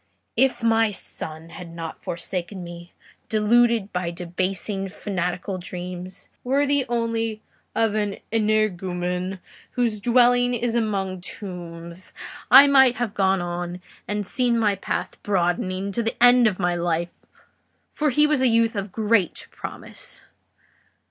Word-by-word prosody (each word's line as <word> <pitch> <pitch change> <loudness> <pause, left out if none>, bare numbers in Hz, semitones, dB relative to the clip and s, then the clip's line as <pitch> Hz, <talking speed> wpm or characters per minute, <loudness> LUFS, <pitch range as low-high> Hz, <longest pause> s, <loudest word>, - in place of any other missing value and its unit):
If 265 -2 +2
my 225 -1 +4
son 160 -4 -5
had 175 0 -9
not 165 -1 -7
forsaken 180 +2 -4
me, 175 0 -10 0.4
deluded 225 0 +3
by 180 -1 -1
debasing 185 +3 -3
fanatical 185 -1 -3
dreams, 180 +1 -7 0.2
worthy 280 +1 +2
only 230 -2 -1 0.3
of 225 -2 +2
an 205 -2 -1 0.2
energumen 185 -4 0 0.4
whose 235 -4 0
dwelling 245 +1 +4
is 235 0 -1
among 195 -5 -1
tombs, 175 -2 -7 0.4
I 270 +3 +10
might 265 -3 +6
have 240 -5 -2
gone 190 -1 +2
on 175 0 -4 0.3
and 205 0 -2
seen 240 +3 +1
my 215 -3 +3
path 195 - -4
broadening 185 0 0
to 235 - -1
the 225 0 -2
end 245 0 +7
of 200 -4 0
my 175 -1 +1
life; 170 0 -1 0.8
for 300 0 +1
he 295 +3 +4
was 300 -3 +2
a 260 - +5
youth 230 -1 +3
of 200 -1 -3
great 215 -4 +1
promise. - - -6
200 Hz, 130 wpm, -24 LUFS, 180-230 Hz, 0.8 s, I